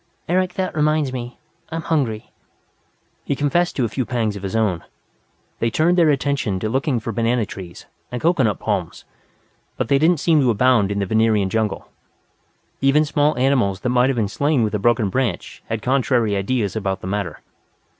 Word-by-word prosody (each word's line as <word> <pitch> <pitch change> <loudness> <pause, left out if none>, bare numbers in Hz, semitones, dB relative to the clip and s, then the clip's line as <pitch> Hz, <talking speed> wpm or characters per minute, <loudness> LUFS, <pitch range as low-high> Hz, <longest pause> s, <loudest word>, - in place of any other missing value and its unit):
"Eric, 180 +1 0
that 185 -3 -2
reminds 150 -3 +1
me 125 -1 -6 0.3
that 160 - -5
I'm 165 - -2
hungry." 130 -10 -1 0.9
He 140 - -1
confessed 160 +6 0
to 130 - +1
a - - 0
few 130 +4 -2
pangs 110 -3 -1
of 100 - -7
his 95 +1 -4
own. 100 -7 0 0.8
They 115 - +1
turned 160 +10 +2
their 170 -3 +4
attention 140 -9 0
to 110 - -1
looking 135 +1 0
for 115 +1 -5
banana 115 +1 0
trees, 95 -4 -10 0.3
and 125 - -3
coconut 135 - +2
palms, - - -3 0.7
but - - -2
they 140 - +4
did 160 +3 +4
not 175 -4 +2
seem 160 0 +3
to 130 - +2
abound 115 -3 +3
in 100 - -2
the 100 - 0
Venerian 110 -2 +2
jungle. 110 -1 -1 0.9
Even 140 +3 +4
small 145 0 +1
animals 125 -7 +1
that 125 - -1
might 125 +1 +3
have 135 - -1
been 110 -3 +1
slain 140 +5 +1
with 110 - -1
a 105 - 0
broken 120 -1 +2
branch 115 -4 -2
had 110 -1 -3
contrary 125 -5 +1
ideas 100 +1 -1
about 95 -3 -2
the - - -8
matter. 95 -5 -3
120 Hz, 190 wpm, -21 LUFS, 105-140 Hz, 0.9 s, their